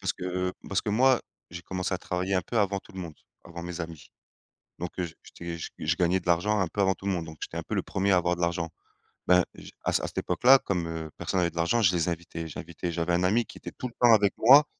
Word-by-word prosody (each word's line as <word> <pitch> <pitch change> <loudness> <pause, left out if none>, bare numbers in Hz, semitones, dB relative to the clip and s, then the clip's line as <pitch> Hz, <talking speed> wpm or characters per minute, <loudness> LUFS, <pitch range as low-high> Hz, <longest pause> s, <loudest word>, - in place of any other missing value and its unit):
parce - - 0
que 90 0 -2 0.2
parce 100 - +1
que 105 - -2
moi, 130 +3 +4 0.3
j'ai 85 0 -7
commencé 95 0 -2
à - - -3
travailler 90 +2 -2
un 90 - +2
peu 115 - -2
avant 100 -1 +2
tout 110 - -18
le 95 - -6
monde, 85 -3 -7 0.3
avant 85 0 -8
mes 90 0 -5
amis, 80 -3 -7 0.7
donc 90 0 -4
heu, 90 - +1
j'é 80 -2 -7
j'étais, 85 -1 -7 0.3
je 80 +2 +2
gagnais 90 +1 +2
de 90 - -20
l'argent 90 +5 +2
un 95 - +1
peu 100 - -3
avant 95 -1 +3
tout 95 - -11
le 100 - +2
monde, 85 -3 -2
donc 80 0 -10
j'étais - - -6
un - - -2
peu - - -4
le - - +1
1er 100 +1 0
à - - +6
avoir 90 0 +2
de - - -8
l'argent. 85 -1 0 0.6
Ben 90 0 +6
je - - -11
à - - +1
à - - 0
cette - - -1
époque-là, 135 +2 +5
comme, 90 -7 -2
heu, 80 -1 -5
personne 85 +2 -1
n'avait 85 -1 +2
de - - -22
l'argent, 85 +8 +2
je 90 -3 +4
les 85 -1 +1
invitais, 85 -1 -5
j'invitais, 85 +3 -5
j'avais 85 +1 -1
un 90 - +2
ami 110 +6 +3
qui - - -12
était - - -8
tout 125 - -5
le 120 - -12
temps 120 -2 +7
avec 100 -2 +4
moi, 140 +6 +8
90 Hz, 275 wpm, -28 LUFS, 85-100 Hz, 0.7 s, moi